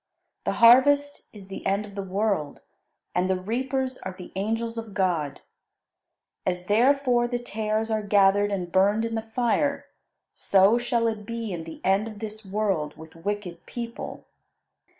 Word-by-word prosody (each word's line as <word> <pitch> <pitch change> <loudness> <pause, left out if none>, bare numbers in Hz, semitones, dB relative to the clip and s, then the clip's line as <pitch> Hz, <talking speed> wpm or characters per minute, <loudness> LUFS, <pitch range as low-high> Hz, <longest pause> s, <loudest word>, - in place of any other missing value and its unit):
The - - +1
harvest 285 +5 +5
is 200 -3 -12
the 195 - -7
end 200 +2 0
of 205 - -12
the 200 - -4
world, 195 -5 -1 0.5
and 180 +1 +1
the 190 -1 +1
reapers 260 +6 -2
are 190 - -6
the 180 -1 -11
angels 225 +4 -2
of 225 -4 -7
God. 170 -7 0 1.0
As 180 -1 -2
therefore 245 +3 +3
the 245 0 -1
tares 220 -1 -2
are 215 -1 +1
gathered 205 0 +3
and 180 -3 -3
burned 205 +4 +3
in 230 - -3
the 225 - -1
fire, 240 +5 0 0.5
so 200 +4 +4
shall 240 -1 0
it 220 -2 -1
be 230 -3 -4
in 165 -2 -5
the 160 - -10
end 195 +3 +2
of 215 -2 -8
this 215 0 -7
world 195 -7 -1
with 160 +1 -12
wicked 180 -1 -4
people. 235 -1 -6
210 Hz, 160 wpm, -26 LUFS, 190-230 Hz, 1.0 s, harvest